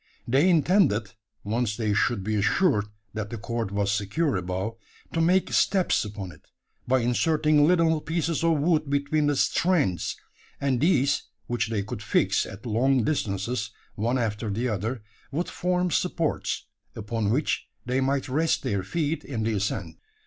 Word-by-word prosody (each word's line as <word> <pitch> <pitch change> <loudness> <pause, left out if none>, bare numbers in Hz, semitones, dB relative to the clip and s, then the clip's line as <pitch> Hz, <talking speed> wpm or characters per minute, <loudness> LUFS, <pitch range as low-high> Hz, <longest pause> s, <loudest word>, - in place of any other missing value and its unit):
They 135 +9 +4
intended 160 - +3 0.3
once 110 0 -1
they 110 -3 0
should 105 0 +1
be 110 +2 -2
assured 105 - +2 0.3
that 110 -2 -4
the 115 - -5
cord 115 -1 -3
was 100 0 0
secure 105 +10 0
above 95 +4 -3 0.4
to 165 - +1
make 180 +3 +2
steps 190 -2 +3
upon 100 -3 -6
it, - - -18 0.4
by 130 0 +3
inserting 150 +4 +3
little 165 -3 +3
pieces 165 +1 -1
of 165 -2 +3
wood 155 -1 +1
between 145 +2 +1
the 145 - +2
"strands;" 150 - +1 0.4
and 135 -3 0
these, 140 -5 +2 0.2
which 120 -2 -1
they 105 -3 -1
could 110 +1 -6
fix - - +1
at 100 +4 -10
long 125 +3 +2
distances, 110 -3 -1 0.2
one 120 +5 0
after 110 -2 -2
the 115 +5 -1
other, 110 +2 -3 0.3
would 165 +5 -2
form 180 0 0
supports, 165 -3 -1 0.3
upon 105 0 -2
which 135 +7 0 0.2
they 125 +2 0
might 135 +1 0
rest 155 +5 +1
their 100 -1 0
feet 150 - -2
in 115 -6 -3
the 110 0 0
ascent. 105 0 -2
125 Hz, 155 wpm, -26 LUFS, 105-155 Hz, 0.4 s, They